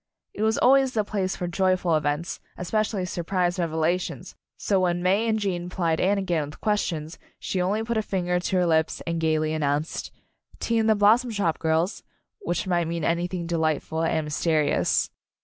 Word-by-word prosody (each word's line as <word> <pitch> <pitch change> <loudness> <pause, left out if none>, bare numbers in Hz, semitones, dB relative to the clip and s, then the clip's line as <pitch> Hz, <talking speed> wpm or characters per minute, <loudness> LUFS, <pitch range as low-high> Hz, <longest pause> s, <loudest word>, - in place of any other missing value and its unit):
It - - -6
was 220 0 +2
always 265 0 +4
the 215 - +1
place 195 -2 -2
for 180 - -4
joyful 185 -1 +1
events, 150 +4 -1 0.2
especially 205 +1 -1
surprise 175 0 -1
revela 165 +1 +1
tions, - - -7 0.2
so 195 -2 +1
when 175 -1 0
May 200 +5 +2
and 220 - +2
Gene 180 -4 -2
plied 170 -3 0
Anne 200 +2 +3
again 170 -6 -1
with 145 - -12
questions, 170 -7 -2 0.2
she 185 - -2
only 205 +5 0
put 235 0 -2
a - - +2
fin 190 -4 -2
ger 180 0 +1
to 180 - -2
her 180 -1 +3
lips 160 -1 +1
and 170 -1 -2
gayly 155 -1 +1
announced: 150 0 -1 0.5
"Tea 230 -1 +1
in 220 - +2
the 220 - +5
Blossom 220 +5 +4
Shop, 200 -7 -1
girls," 160 +4 0 0.4
which 175 - -2
might 175 -3 +1
mean 170 -1 -3
anything 170 +2 -1
delightful 160 -1 -1
and 160 -1 +1
mysterious. 155 0 +1
175 Hz, 185 wpm, -25 LUFS, 160-200 Hz, 0.5 s, the